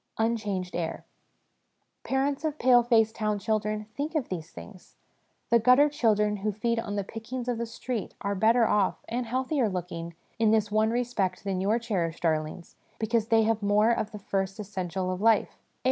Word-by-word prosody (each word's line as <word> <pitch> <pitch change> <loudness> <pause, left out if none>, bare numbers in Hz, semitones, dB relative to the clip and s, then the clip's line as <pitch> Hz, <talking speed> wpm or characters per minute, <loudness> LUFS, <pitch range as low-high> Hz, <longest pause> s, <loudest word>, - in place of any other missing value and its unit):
Unchanged 210 -5 -1
Air. 165 -2 -3 1.0
Parents 275 +2 0
of 305 -1 -2
pale 245 -2 +5
faced 225 -2 +3
town 215 -2 -1
children, 215 +1 -1
think 300 +3 -3
of 295 -5 -1
these 165 -3 -5
things! 185 +2 -13 0.6
The 235 - +6
gutter 255 +6 +5
children 210 -7 +1
who 210 +2 -1
feed 230 +3 -1
on 205 -3 -4
the 200 - -1
pickings 235 +5 -6
of 240 -2 -1
the 235 - -2
streets 230 -1 -5
are 200 - -1
better 225 +4 +4
off 205 -2 +1
(and 240 +1 -3
healthier 255 0 0
looking) 170 -2 -5 0.2
in 225 -1 +4
this 215 -1 +2
one 215 +1 +3
respect 230 -6 -1
than 190 -2 -2
your 205 +4 +2
cherished 185 -9 -2
darlings, 155 +1 -2 0.2
because 225 0 0
they 225 -1 +4
have 220 0 +1
more 210 +3 +3
of 215 -2 -1
the 210 - -7
first 195 0 -3
essential 185 -2 -3
of 185 +1 -4
life 225 0 +4
air. - - -28
215 Hz, 180 wpm, -27 LUFS, 195-235 Hz, 1.0 s, The